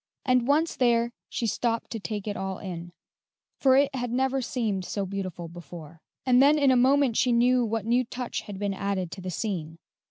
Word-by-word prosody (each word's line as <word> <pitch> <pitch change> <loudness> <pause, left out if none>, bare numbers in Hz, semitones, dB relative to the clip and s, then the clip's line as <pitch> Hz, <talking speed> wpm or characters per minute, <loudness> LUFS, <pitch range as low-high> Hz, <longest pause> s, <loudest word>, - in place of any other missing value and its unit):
And 250 -2 +3
once 310 +4 +2
there 235 -1 +2 0.2
she 235 - -2
stopped 230 +1 -1
to 225 - -3
take 210 0 -5
it 205 - -2
all 190 -1 -3
in, 175 -3 -7 0.7
for 265 -1 +5
it 280 0 +3
had 245 -2 -2
never 265 +2 +1
seemed 220 -7 -2
so 200 +2 -3
beautiful 185 -3 -5
before; 165 -1 -11 0.2
and 250 -1 +5
then 290 +2 +6
in 280 -3 +4
a - - +4
moment 260 -1 +3
she 250 - +3
knew 245 +1 +4
what 225 -2 -2
new 240 +2 +3
touch 245 0 -4
had 205 -2 -8
been 200 0 -1
added 195 -3 -2
to 190 - -8
the 185 - -5
scene. 170 -5 -4
230 Hz, 200 wpm, -27 LUFS, 190-255 Hz, 0.7 s, then